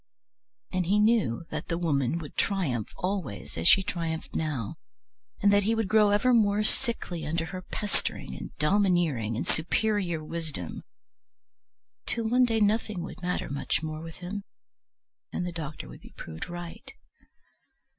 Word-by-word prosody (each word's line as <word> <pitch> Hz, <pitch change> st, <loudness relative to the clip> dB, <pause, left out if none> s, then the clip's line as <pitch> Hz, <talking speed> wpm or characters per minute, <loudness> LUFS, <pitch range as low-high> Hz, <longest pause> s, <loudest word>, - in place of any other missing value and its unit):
And 185 Hz, -2 st, 0 dB
he 200 Hz, +3 st, +4 dB
knew 210 Hz, -, +3 dB
that 150 Hz, -, -4 dB
the 165 Hz, -, -1 dB
Woman 150 Hz, -4 st, +1 dB
would 155 Hz, -4 st, -7 dB
triumph 150 Hz, -, 0 dB
always 180 Hz, -, -3 dB
as 80 Hz, +1 st, +1 dB
she 195 Hz, -, +8 dB
triumphed 165 Hz, -3 st, -3 dB
now, 140 Hz, -10 st, -2 dB, 0.7 s
and 205 Hz, 0 st, +6 dB
that 205 Hz, -, +6 dB
he 220 Hz, +3 st, +2 dB
would 225 Hz, -3 st, 0 dB
grow 210 Hz, +1 st, +5 dB
ever 210 Hz, +5 st, +4 dB
more 210 Hz, -2 st, +4 dB
sickly 220 Hz, -8 st, -1 dB
under 165 Hz, +2 st, -1 dB
her 185 Hz, +2 st, -6 dB
pestering 190 Hz, -, -3 dB
and -, -, -6 dB
domineering 155 Hz, -, +2 dB
and -, -, -2 dB
superior 175 Hz, -1 st, +1 dB
wisdom, 155 Hz, -, -4 dB, 1.3 s
till 230 Hz, -2 st, +1 dB
one 250 Hz, +2 st, +5 dB
day 225 Hz, -2 st, +1 dB
nothing 210 Hz, -3 st, +1 dB
would 175 Hz, -, -8 dB
matter 180 Hz, 0 st, -1 dB
much 140 Hz, +3 st, -1 dB
more 155 Hz, 0 st, -4 dB
with 165 Hz, 0 st, -8 dB
him, 195 Hz, +3 st, -5 dB, 0.9 s
and 180 Hz, -, -2 dB
the 180 Hz, -, -2 dB
doctor 155 Hz, -3 st, -5 dB
would -, -, -11 dB
be -, -, -15 dB
proved 80 Hz, -, -6 dB
right. 175 Hz, -1 st, -8 dB
175 Hz, 155 wpm, -28 LUFS, 155-205 Hz, 1.3 s, she